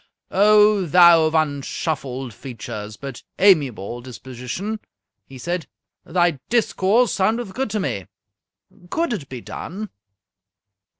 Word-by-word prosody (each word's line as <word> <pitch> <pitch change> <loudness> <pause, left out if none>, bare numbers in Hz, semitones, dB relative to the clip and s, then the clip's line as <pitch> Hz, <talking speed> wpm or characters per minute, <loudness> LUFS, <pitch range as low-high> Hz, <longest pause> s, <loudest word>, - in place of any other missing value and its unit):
"O 210 -1 +5
thou 170 0 +7
of 155 - -2
unshuffled 140 -4 -2
features 110 -3 -7
but 135 -3 -8 0.2
amiable 135 - +3
disposition!" 130 - -6 0.5
he 135 - -11
said, 175 +5 -3 0.4
"thy 175 -4 +1
discourse 225 0 +2
soundeth 210 +2 0
good 265 +1 -2
to 210 +1 -1
me. 100 - -3 0.8
Could 330 - 0
it 155 -10 -5
be 125 -2 -7
done?" 205 - -7
165 Hz, 110 wpm, -22 LUFS, 130-205 Hz, 0.8 s, thou